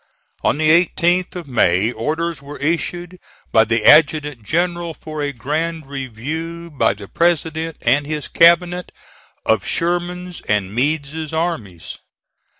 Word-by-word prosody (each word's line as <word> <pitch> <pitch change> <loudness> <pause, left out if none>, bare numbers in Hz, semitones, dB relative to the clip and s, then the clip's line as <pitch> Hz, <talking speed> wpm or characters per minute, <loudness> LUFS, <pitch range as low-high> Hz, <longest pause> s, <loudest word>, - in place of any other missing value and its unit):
On - - +2
the 155 0 +2
18th 175 +2 +2
of 175 -4 -6
May 105 -4 +2
orders 155 +7 -3
were 145 +1 -9
issued 175 +3 -2 0.3
by 110 -1 +5
the 115 0 0
adjutant 150 -3 +5
general 170 - -1
for 155 -1 -7
a 145 -1 -1
grand 155 +5 -3
review 150 +6 -6
by 140 - +1
the 100 -1 -10
President 165 - 0
and 140 +4 +2
his 150 -2 -4
cabinet 175 +1 +3 0.5
of - - +2
Sherman's 175 +1 -2
and 100 -2 0
Meade's 150 +4 -1
armies. 160 - -4
155 Hz, 130 wpm, -19 LUFS, 135-170 Hz, 0.5 s, by